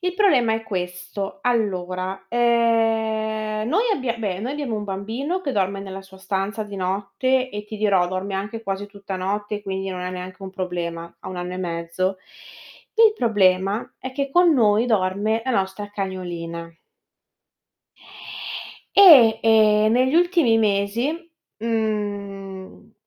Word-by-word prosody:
Il 360 0 -2
problema 275 - +4
è 225 - -3
questo: 180 +2 -5
allora, 190 -5 -1
ehm, 225 -2 +1
noi 415 - +2
abbia 255 - -2
beh, 200 -5 -3
noi 250 +6 -3
abbiamo 285 -6 -3
un 210 - -4
bambino 225 - -3
che 280 -7 -3
dorme 195 -1 0
nella 195 0 -7
sua 190 0 -16
stanza 200 +3 -2
di 205 - -9
notte 205 +8 0
e, 210 0 -6
ti 215 +1 -8
dirò, 200 -4 +2
dorme 185 +2 -3
anche 210 +4 -4
quasi 195 0 -3
tutta 200 -2 -7
notte, 205 +2 -3
quindi 195 -1 -3
non 185 -1 -5
è 180 - -3
neanche 185 +1 -8
un 190 - -6
problema. 170 -2 -4
Ha - - -8
1 185 - -6
anno 180 0 -4
e - - -5
mezzo. 175 +2 -2 0.8
Il 450 -1 +6
problema 195 -2 +1
è 260 - -7
che 275 0 -2
con 350 +1 +5
noi 220 -2 +3
dorme 210 +1 +1
la 260 - -1
nostra 195 0 -1
cagnolina. 175 -4 -5 2.3
E, 260 - +9
ehm, 215 -1 +5
negli 255 +4 +3
ultimi 340 -9 +4
mesi, 215 +7 +1 0.4
mhmm, 205 -4 -4
205 Hz, 145 wpm, -23 LUFS, 190-230 Hz, 2.3 s, E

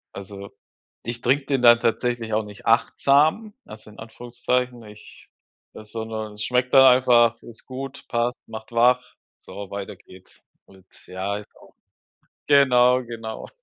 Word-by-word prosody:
Also, 100 0 -10 0.5
ich 120 0 -6
trinke 135 +3 +1
den 135 -3 -1
dann 120 -1 +7
tatsächlich 115 -1 -2
auch 110 0 +1
nicht 105 -1 -13
achtsam, 150 - +2
also 110 0 -13
in - - -17
Anführungszeichen, 120 +2 -4
ich 105 0 -16 0.4
äh, 110 - -11
sondern 110 -1 -6
es 105 - -6
schmeckt 125 +1 -1
dann 135 -1 +8
einfach, 120 -2 +3
ist 115 -1 -14
gut, 135 +1 -8
passt, 120 +1 -2
macht 110 +1 -10
wach. 125 +2 +2 0.3
So, 100 -1 -10
weiter 100 -1 -7
geht's. 95 0 -18 0.2
Und 95 -1 -21 0.2
ja, 95 +2 -4
ist 105 - -13
auch - - -20 0.7
genau, 125 -3 +4
genau. 115 -2 -8
115 Hz, 145 wpm, -22 LUFS, 105-125 Hz, 0.7 s, dann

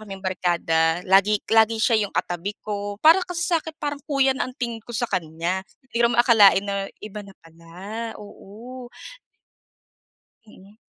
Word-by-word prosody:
kaming 195 -3 -9
barkada 170 -3 +1
lagi-lagi 210 +3 +3
siya 225 -3 +3
'yong - - -16
katabi 175 +4 -2
ko, 205 -1 -4
para 330 +4 +7
kasi 355 -1 -4
sa'kin 325 -2 -1
parang 290 -1 -3
kuya 275 -2 +3
na - - -1
ang - - -10
tingin 235 -2 -3
ko 240 - -10
sa 240 0 -1
kanya. 170 +1 -2 0.3
Hindi 235 - -9
ko - - +3
naman 240 0 +3
akalain 210 -6 +6
na 200 -1 -2 0.2
iba 210 0 -7
na 195 - -13
pala. 180 +8 -8
Oo. 235 +5 -11 1.5
Mm. 205 -1 -18
210 Hz, 155 wpm, -23 LUFS, 190-240 Hz, 1.5 s, para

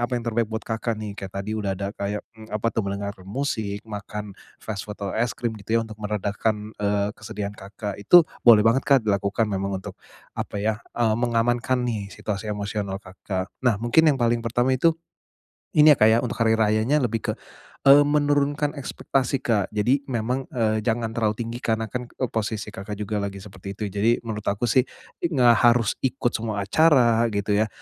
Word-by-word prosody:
apa 120 +1 0
yang 120 - -4
terbaik 115 -1 0
buat 110 0 -4
Kakak 115 0 -2
nih. 105 -1 -5
Kayak 95 -1 -7
tadi 100 +2 -4
udah 100 -3 -2
ada 100 +1 -4
kayak, 100 0 -4
mmm, 110 -1 -14
apa 105 0 -2
tuh - - 0
mendengar 100 0 -3 0.2
musik, 110 -4 -3
makan 105 -1 -6 0.2
fast 105 -1 -6
food, 105 - -6
atau 100 -1 -4
es 115 0 -1
krim 120 -2 -2
gitu 110 +3 0
ya, 115 - +1
untuk 110 -1 -11
meredakan, 105 +1 -2
eee, 100 0 0
kesedihan 105 -3 -6
Kakak 100 0 -7
itu, 165 - +7 0.2
boleh 110 -3 +7
banget, 115 +4 +2
Kak, 135 -5 +5
dilakukan, 100 +1 +1
memang 100 0 -1
untuk, - - -9 0.3
apa - - -5
ya, 110 +2 -1 0.2
eee, 115 -2 +2
mengamankan 120 +2 +1
nih 110 -5 -3
situasi 105 +1 -5
emosional 100 -1 -3
Kakak. 95 0 -5
Nah 125 -5 +2
mungkin 120 +9 +4
yang 145 - +3
paling 120 -2 +1
pertama 120 +3 +1
itu, 160 +6 +3 0.8
ini 150 0 +8
ya, 145 - +4
Kak, 110 - +6
ya, 110 +1 +5
untuk 120 - -4
hari 110 -1 +4
rayanya 110 +6 +2
lebih 115 -2 0
ke, - - -2 0.5
eee, 140 +1 +8
menurunkan 145 0 +1
ekspektasi, 135 0 -1
Kak, 105 -5 +1
jadi 120 +7 +2
memang, 125 +1 -2
eee, 110 -3 0
jangan 115 0 -1
terlalu 110 -2 0
tinggi 115 +1 -5
karena 110 -2 -1
kan 125 -1 -4
e 130 - -3
posisi 110 -1 -3
Kakak 105 0 -6
juga 105 +1 -3
lagi 100 -1 -5
seperti 100 -1 -9
itu. 110 - -5
Jadi, 110 +5 +1
menurut 110 -2 -5
aku 100 +3 -1
sih 130 0 +3 0.3
i - - 0
nggak 125 -7 +5
harus 115 -2 +2
ikut 130 -2 0
semua 110 -3 -2
acara, 120 -2 +4
gitu 100 -2 -2
ya, 110 - +2
110 Hz, 195 wpm, -24 LUFS, 105-120 Hz, 0.8 s, ini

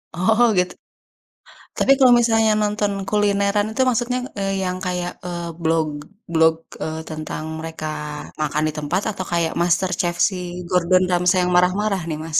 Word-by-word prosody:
Oh, 220 +7 +3
gitu 180 0 +1 1.0
tapi - - +3
kalau 260 -2 +7
misalnya 225 -2 +3
nonton 210 0 0 0.2
kulineran 205 0 +2
itu, 260 - -1
maksudnya, 250 +1 0 0.2
eee, 195 0 -1
yang 180 0 -2
kayak, 180 -1 -2
eee, 170 -1 -4
blog 160 -1 +1 0.5
blog, 160 0 +4 0.3
eee, 160 0 -4
tentang 155 0 -5 0.2
mereka 160 -1 -6 0.6
makan 150 0 0
di 155 - -3
tempat 150 +6 -1
atau 190 - -6
kayak 170 -1 0
MasterChef 175 0 +1
si 190 - -7 0.3
Gordon 180 +1 +3
Ramsay 180 +1 +3
yang 180 - 0
marah-marah 190 +2 +2
nih, 155 - -3
Mas? 160 -2 +1
180 Hz, 150 wpm, -21 LUFS, 165-205 Hz, 1.0 s, kalau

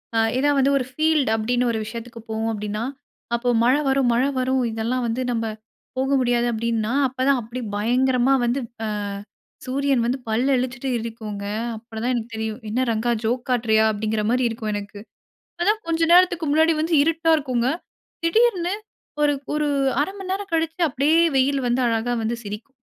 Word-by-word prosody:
அ - - +3 0.2
ஏதாவது 285 +1 +2
வந்து 270 +1 +3
ஒரு 255 - -1
ஃபீல்டு 310 -4 +2
அப்டீன்னு 245 +3 0
ஒரு 220 - -2
விஷயத்துக்கு 230 +1 -8
போவோம் 220 +1 -1
அப்டீன்னா, 210 +1 -3 0.5
அப்போ 245 +1 -1
மழை 260 +5 +4
வரும் 265 -2 +2
மழை 255 +4 +2
வரும் 260 0 +1
இதெல்லாம் 235 +3 -1
வந்து 230 +3 -2
நம்ப 230 -1 -1 0.5
போக 265 +1 0
முடியாது. 240 -1 +2
அப்டீன்னா, 230 0 -1
அப்போதான் 260 +1 +1
அப்டி 240 +3 -6 0.2
பயங்கரமா 255 +4 +2
வந்து 240 +3 0 0.3
அ - - -2 0.8
சூரியன் 270 -2 +1
வந்து 255 +3 0
பல் 225 +4 +1
இளிச்சுட்டு 250 +1 -3
இருக்குங்க. 220 -3 -6 0.3
அப்பதான் 230 +2 -3
எனக்கு 235 -1 -4
தெரியும், 220 +2 -4
"என்ன 250 +4 +1
ரங்கா, 225 +2 0
ஜோக் 245 +2 0
காட்டுறீயா?" 220 -3 +3
அப்படிங்குற 215 +1 -1
மாதிரி 250 0 +2
இருக்கும் 220 -2 -4
எனக்கு. 205 0 -6 0.6
அதான் 425 +4 +2
கொஞ்ச 330 0 0
நேரத்துற்கு 350 -2 +5
முன்னாடி 320 +2 +4
வந்து 325 +1 0
இருட்டா 325 +1 +2
இருக்குங்க. 255 -4 0 0.6
திடீர்ன்னு 380 -1 +2 0.5
ஒரு 295 0 +4 0.2
ஒரு 300 0 0 0.3
அரை 305 +7 0
மணி 375 -1 -6
நேரம் 395 0 -4
கழிச்சி 325 +1 -1
அப்டியே 295 +5 +3 0.2
வெயில் 270 +1 +2
வந்து 240 +2 +1
அழகா 230 +1 0
வந்து 230 +2 -1
சிரிக்கும். 210 +6 -7
250 Hz, 165 wpm, -23 LUFS, 225-280 Hz, 0.8 s, நேரத்துற்கு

